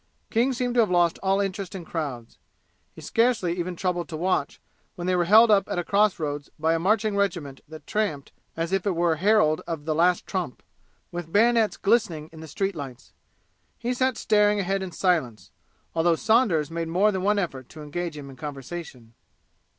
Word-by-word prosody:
King 240 +4 +2
seemed 245 -1 -2
to 245 - +2
have 220 - +4
lost 175 -2 +2
all 195 0 +2
interest 195 -1 -3
in 175 -3 -7
crowds. 135 -10 -5 0.5
He - - -13
scarcely 225 -7 +1
even 180 +1 -3
troubled 175 -1 -2
to 155 - -5
watch 185 +3 -1 0.4
when 175 -3 -6
they 185 0 +1
were 175 -1 +2
held 220 +5 +7
up 195 -2 +3
at - - -2
a 175 - 0
cross 205 +2 +2
roads 145 -3 -4
by 160 +1 +1
a 165 - 0
marching 210 +3 +1
regiment 170 -9 -2
that 155 +1 -11
tramped 200 -10 -2 0.3
as 165 +1 -2
if 195 +1 0
it 190 - +1
were 170 -1 +1
herald 175 -4 +3
of 160 -4 -5
the 155 - 0
Last 175 +3 +2
Trump, 180 -10 -4 0.5
with 175 -2 -6
bayonets 225 +1 +3
glistening 195 -8 0
in 160 - -11
the 160 - -9
street 195 +5 -2
lights. 135 -4 -9 0.6
He 240 +2 -2
sat 255 -1 0
staring 210 -1 +3
ahead 195 0 -1
in 190 -1 -5
silence, 160 - -1 0.4
although 165 +1 +3
Saunders 220 - +2
made 165 0 -3
more 190 +6 +3
than 190 -2 -2
one 205 +2 +2
effort 135 -10 -3
to 155 -1 -10
engage 165 +1 -4
him 145 -2 -8
in 135 - -11
conversation. 135 -3 -8
175 Hz, 195 wpm, -25 LUFS, 160-205 Hz, 0.6 s, held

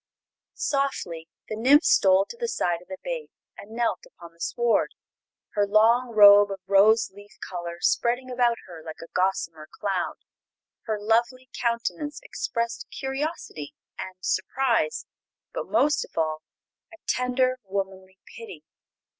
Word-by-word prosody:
Softly 220 - -2 0.2
the 215 - -4
nymph 270 +8 +5
stole 190 0 +5
to - - -10
the 470 0 -3
side 175 - -1
of 180 - -18
the 285 - -7
babe - - -4 0.3
and 200 - -12
knelt 235 - -1
upon 170 - -14
the 170 - -29
sward, 235 +6 +1 0.6
her 205 -2 +1
long 230 +4 +4
robe 205 -1 +9
of 195 -1 -5
rose 200 +2 +4
leaf 205 +1 -15
color 175 -2 -5
spreading 245 +2 +1
about 245 -2 +2
her 170 -3 -11
like 160 -1 -8
a 165 - -13
gossamer 165 -4 -1
cloud. 195 -4 -2 0.7
Her 215 -1 0
lovely 235 +4 0
countenance 240 +5 -2
expressed 235 -1 -3
curiosity 270 - -5 0.2
and 185 0 -6
surprise, 190 -1 0 0.5
but, - - -4
most 295 +1 +3
of - - -16
all, 155 -1 0 0.5
a 335 - -13
tender, 255 0 +1
womanly 190 -1 -5 0.2
pity. 225 -10 -10
215 Hz, 140 wpm, -26 LUFS, 185-255 Hz, 0.7 s, robe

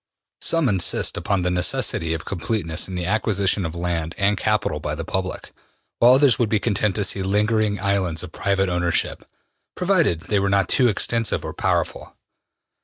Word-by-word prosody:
Some 165 -4 +2
insist 95 -6 +2
upon 100 -3 -1
the 90 - 0
necessity 80 -2 0
of 80 - -7
completeness 90 -3 -2
in 95 - -7
the 90 -1 -3
acquisition 100 -2 0
of 80 - -8
land 85 -2 -3
and 100 +1 +2
capital 105 -7 -1
by 75 0 -3
the 80 +1 -5
public, 95 +1 -4 0.5
while 120 +2 +7
others 135 -5 +4
would 120 -3 +1
be 110 - +1
content 105 -2 0
to 105 - +1
see 95 0 -1
lingering 105 +1 +1
islands 95 -4 -1
of 90 - -9
private 95 +1 0
ownership, 90 -1 -1 0.5
provided 170 - +1
they 100 +5 0
were 100 0 0
not 100 -1 +1
too 125 - +3
extensive 115 +1 0
or - - -5
powerful. - - -2
100 Hz, 175 wpm, -22 LUFS, 90-110 Hz, 0.5 s, while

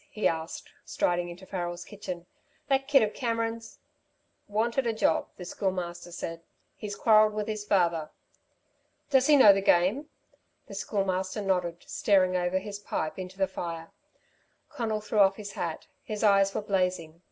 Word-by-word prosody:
he 215 - 0
asked, 160 0 -4
striding 175 0 0
into 175 +2 -10
Farrel's 175 -2 -4
kitchen. 180 -4 -7 0.4
"That 270 0 +2
kid 280 -4 +5
of 215 - -1
Cameron's 230 -1 -3 0.4
" - - -45
"Wanted 235 +3 +1
a 230 - +1
job," 190 -7 +1
the 180 - -8
Schoolmaster 175 -2 -3
said. 165 -1 -6 0.3
"He's 205 -1 -6
quarrelled 215 0 +5
with 210 0 -2
his 215 -1 -3
father." 170 -6 +1 1.0
"Does 265 0 +4
he 300 - +7
know 215 -8 +9
the 195 - 0
game?" 195 - +2 0.6
The - - -11
Schoolmaster 190 0 -2
nodded, 180 -3 -1
staring 185 -3 +2
over 180 +1 +1
his 200 +1 -5
pipe 160 -4 -3
into 185 +1 -7
the 195 - +3
fire. 165 -3 -6 0.8
Conal 225 -7 -2
threw 215 0 -1
off 195 -1 +6
his 205 -1 -7
hat. 170 -4 -4 0.2
His 215 0 -5
eyes 195 -1 +4
were - - 0
blazing. 180 -5 -1
195 Hz, 160 wpm, -28 LUFS, 175-215 Hz, 1.0 s, know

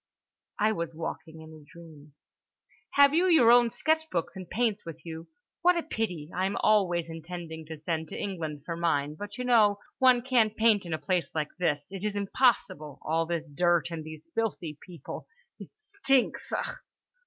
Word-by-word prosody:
I 215 +1 +3
was 170 -5 -4
walking 160 0 -6
in 160 0 -12
a 155 -1 -13
dream. 150 -2 -15 0.8
"Have 280 0 +6
you 350 +4 +3
your 245 -8 +6
sketch 315 +6 0
books 170 -2 -2
and 185 -2 -8
paints 220 -3 0
with 165 0 -10
you? 165 0 -7 0.3
What 360 0 +4
a 340 - -1
pity. 180 - -3
I 185 +1 0
am 195 - -3
always 180 -6 +3
intending 165 -1 -7
to 160 0 -7
send 160 +1 -3
to - - -7
England 160 -7 -4
for 170 - -3
mine, 150 -4 0
but 205 +6 -8
you 250 - -3
know—one 240 +2 +3
can't 235 -4 +2
paint 220 -4 +3
in 165 - -3
a - - -4
place 165 +4 -1
like 150 -1 -1
this. 150 -5 0
It 195 -1 -7
is 210 -1 -1
impossible—all 165 - 0
this 165 -3 -3
dirt 175 +2 +2
and 165 -2 -5
these 155 0 -10
filthy 195 -9 -2
people—it 455 - -11
stinks! 400 - 0
Ugh!" - - -3
175 Hz, 170 wpm, -28 LUFS, 160-225 Hz, 0.8 s, Have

